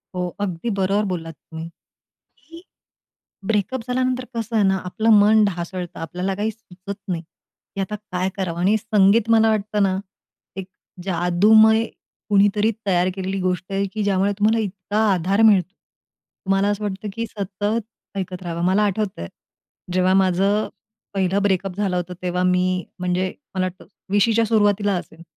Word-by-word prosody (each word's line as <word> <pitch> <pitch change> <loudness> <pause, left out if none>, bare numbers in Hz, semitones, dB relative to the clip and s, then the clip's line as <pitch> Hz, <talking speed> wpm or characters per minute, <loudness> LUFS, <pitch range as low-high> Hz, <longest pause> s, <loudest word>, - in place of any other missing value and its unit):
हो. 180 0 -1
अगदी 195 +1 -3
बरोबर 200 0 +1
बोललात 165 -4 -4
तुम्ही 160 +1 -9 0.7
की 330 +1 -14 0.8
ब्रेकअप 220 +4 0
झाल्यानंतर 255 0 0
कसं 230 0 -2
आहे 210 - +4
ना, 190 0 +3
आपलं 220 +5 0
मन 215 +1 +5
ढासळतं, 180 -2 -4
आपल्याला 180 +4 -3
काही 210 +3 -1
सुचत 200 -3 -9
नाही, 170 -3 -2 0.5
की 195 - -3
आता 195 +2 -3 0.2
काय 185 +1 0
करावं? 180 -4 -3
आणि 195 +5 +3
संगीत 215 +1 +3
मला 225 -1 +5
वाटतं 210 -1 0
ना, 190 -1 +1 0.6
एक 190 -1 -5 0.4
जादूमय 210 +5 +4 0.4
कुणीतरी 205 +1 +3 0.2
तयार 180 -2 +2
केलेली 190 0 -3
गोष्ट 185 +1 -2
आहे, 195 +1 0
की 215 - -2
ज्यामुळे 200 0 +2
तुम्हाला 215 +2 +3
इतका 200 +1 -4
आधार 190 +4 +1
मिळतो. 195 -4 +4 0.7
तुम्हाला 195 +1 +2
असं 205 +1 -1
वाटतं, 205 +1 -4
की 230 +1 -3
सतत 205 +2 -2 0.4
ऐकत 185 -1 -5
राहावं. 170 -1 -4
मला 190 +3 +3
आठवतंय. 200 - -2 0.6
जेव्हा 185 +1 +3
माझं 195 +2 +2 0.5
पहिलं 195 +1 +1
ब्रेकअप 190 -2 0
झालं 195 -3 0
होतं, 180 0 -3
तेव्हा 180 0 -1
मी 180 0 +1
म्हणजे 180 +1 -1 0.2
मला 185 -1 0
वाटतं 185 0 -9 0.3
20च्या 225 +3 +3
सुरुवातीला 205 -2 +2
असेल. 165 -1 -11
195 Hz, 150 wpm, -22 LUFS, 180-210 Hz, 0.8 s, मन